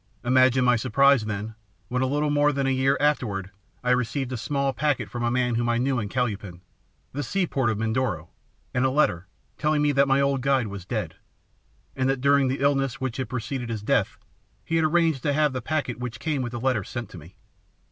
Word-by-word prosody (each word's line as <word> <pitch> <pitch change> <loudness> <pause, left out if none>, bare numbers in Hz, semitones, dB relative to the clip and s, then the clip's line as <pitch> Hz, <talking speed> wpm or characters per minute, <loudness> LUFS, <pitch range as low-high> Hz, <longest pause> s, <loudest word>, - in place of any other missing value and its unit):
Imagine 130 0 +4
my 125 0 +5
surprise, 130 +1 +3
then, 105 +1 -4 0.3
when 125 +1 -1
a 130 - +2
little 145 +2 0
more 145 0 +3
than 140 -1 -1
a 135 - +2
year 135 +1 +2
afterward, 110 -10 0 0.3
I 125 - +2
received 125 +1 0
a - - -2
small 140 +4 -1
packet 145 -1 -1
from 120 - -4
a 120 - +2
man 125 0 +1
whom 120 +1 0
I 120 - +2
knew 130 +1 +1
in 105 -3 -4
Calupan, 105 -7 -3 0.5
the 145 - -2
seaport 145 -8 0
of 110 - -1
Mindoro, 115 +3 -1 0.4
and 125 - +1
a 130 - +3
letter, 95 - +1 0.3
telling 150 -1 +2
me 145 - +3
that 140 0 +3
my 135 0 +3
old 140 -1 +1
guide 135 -2 +2
was 100 -3 -8
dead, - - -4 0.8
and 130 0 0
that 135 -1 0
during 140 0 +3
the 130 +1 -2
illness 135 -2 +1
which 130 -3 -3
had 130 -4 -3
preceded 125 0 -4
his 110 -3 -4
death - - +1 0.5
he 165 - 0
had 160 - +3
arranged 160 -3 +2
to 145 - 0
have 150 -1 +2
the 130 - -3
packet 125 -3 -2
which 125 -1 -5
came 150 -4 -1
with 120 -1 -4
the 120 - -3
letter 125 -4 0
sent 120 +2 -6
to 90 - -9
me. 85 +5 -15
130 Hz, 220 wpm, -25 LUFS, 120-140 Hz, 0.8 s, my